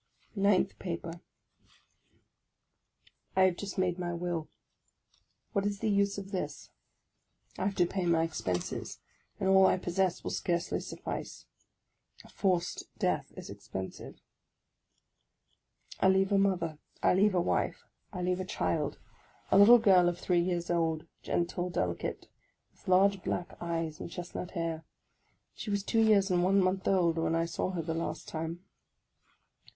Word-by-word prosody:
NINTH 200 -2 +2
PAPER 170 -1 -5 2.1
I 190 - +4
HAVE 185 -2 +4
just 200 -1 -6
made 180 -1 0
my 175 -1 -2
will; 170 -2 -3 1.0
what 200 -3 +1
was 205 0 -1
the 215 +1 0
use 200 0 +2
of 195 0 -7
this? 185 - -5 0.9
I - - 0
have 195 0 -1
to 175 - +4
pay 180 0 -2
my 165 -1 +3
expenses, 90 - -3 0.4
and 195 - 0
all 190 0 +6
I - - +3
possess 180 0 -1
will - - -3
scarcely 170 -1 -1
suffice. - - -6 0.8
A - - -15
forced 180 -3 -1
death - - 0
is - - -8
expensive. 95 0 -7 1.8
I 190 - +5
leave 190 +1 +3
a 200 - +4
mother, 175 -6 0 0.2
I - - +5
leave 195 +1 +3
a - - +4
wife, 175 - -1 0.3
I 180 -4 -4
leave 180 +1 0
a - - -1
child, 150 -5 -1 0.3
— - - -30
a - - +6
little 230 +4 +9
girl 190 -6 +5
of 175 - -4
three 175 -1 +1
years 175 -1 -1
old, 165 -2 0 0.2
gentle, 175 +1 -1
delicate, 90 - -3 0.4
with - - -25
large 190 +1 +4
black 175 - -3
eyes 165 -2 -3
and - - -6
chestnut 175 +1 -6
hair. 165 -1 -2 0.7
She - - -7
was 200 -1 0
two 225 +2 +2
years 205 -3 +4
and 175 -1 +3
one 195 +2 +4
month 185 0 +1
old 170 -4 +3
when 165 0 +1
I 165 0 +1
saw 170 +2 -2
her 170 -2 -2
the 160 +1 -2
last 165 +1 -4
time. 165 +3 -5
180 Hz, 155 wpm, -31 LUFS, 170-195 Hz, 2.1 s, little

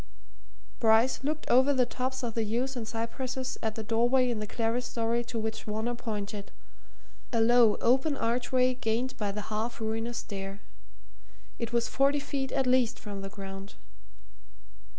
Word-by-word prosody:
Bryce 225 +4 +4
looked 305 +2 -2
over 260 +3 +5
the 255 -2 +3
tops 255 +1 -3
of 235 -2 -2
the 225 - 0
yews 245 +5 -1
and 230 -3 -4
cypresses 255 +3 -3
at 220 -1 -1
the 220 - -4
doorway 240 +3 +3
in 225 - -2
the 210 - -4
clerestory 235 +1 0
to 240 - -4
which 220 0 -3
Varner 220 +3 -1
pointed 210 -3 -4 0.8
a 230 - +1
low, 230 -1 +6
open 265 +4 +3
archway 250 +2 +2
gained 250 +1 -1
by 205 -2 -1
the 210 +2 -6
half 225 +3 -2
ruinous 225 +1 -2
stair. 195 -1 -5 1.0
It 235 -1 -3
was 235 0 +1
forty 280 +2 +3
feet 275 -2 -3
at 270 - +1
least 250 -2 +3
from 200 -2 -6
the 195 - -5
ground. 195 0 -8
235 Hz, 155 wpm, -29 LUFS, 220-255 Hz, 1.0 s, low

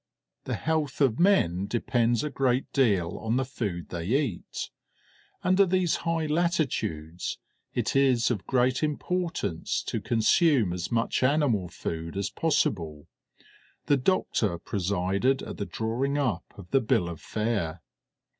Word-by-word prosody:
The - - -2
health 155 -4 -1
of 130 -6 +3
men 100 - +3
depends 120 0 +1
a 150 - -2
great 130 -1 0
deal 100 -10 +2
on 110 +1 -1
the 130 - +1
food 105 -9 -4
they 85 -1 -4
eat; 130 - -2 0.7
under 185 +2 +5
these 185 -2 +2
high 165 -1 -1
latitudes 130 - -1 0.4
it - - -1
is 130 -4 +4
of 105 -6 -3
great 130 0 +2
importance 155 - -1
to - - -3
consume 115 - +3
as 90 -1 -4
much 115 -1 +1
animal 130 - +2
food 80 +1 -5
as 100 -1 -1
possible. 85 - -1 0.8
The 145 - +3
doctor 120 - +1
presided 100 +8 0
at - - -7
the 100 - -3
drawing 125 +6 -1
up 125 -11 -1
of 90 -3 -12
the 135 - +4
bill 100 -6 +1
of 85 -2 -7
fare. 100 -7 -2
120 Hz, 135 wpm, -27 LUFS, 95-145 Hz, 0.8 s, under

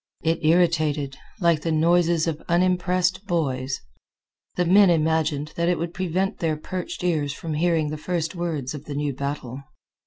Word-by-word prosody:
It 165 +1 0
irritated, 155 -4 +2 0.2
like 170 -4 +3
the 165 - -1
noises 170 +1 +3
of 160 -2 -3
unimpressed 180 +2 +1
boys. 135 -7 -1 0.7
The 180 - +1
men 195 +2 +6
imagined 155 -2 +1
that 170 +1 +1
it 180 - +2
would 170 +2 -4
prevent 185 +2 -1
their 160 -2 0
perched 180 +3 -5
ears 155 -5 0
from 160 +2 -5
hearing 160 -1 +1
the 155 - -4
first 170 -2 -2
words 160 -7 -3
of 150 -1 -8
the 145 - -6
new 145 -1 -1
battle. 140 -1 -5
165 Hz, 160 wpm, -24 LUFS, 150-175 Hz, 0.7 s, men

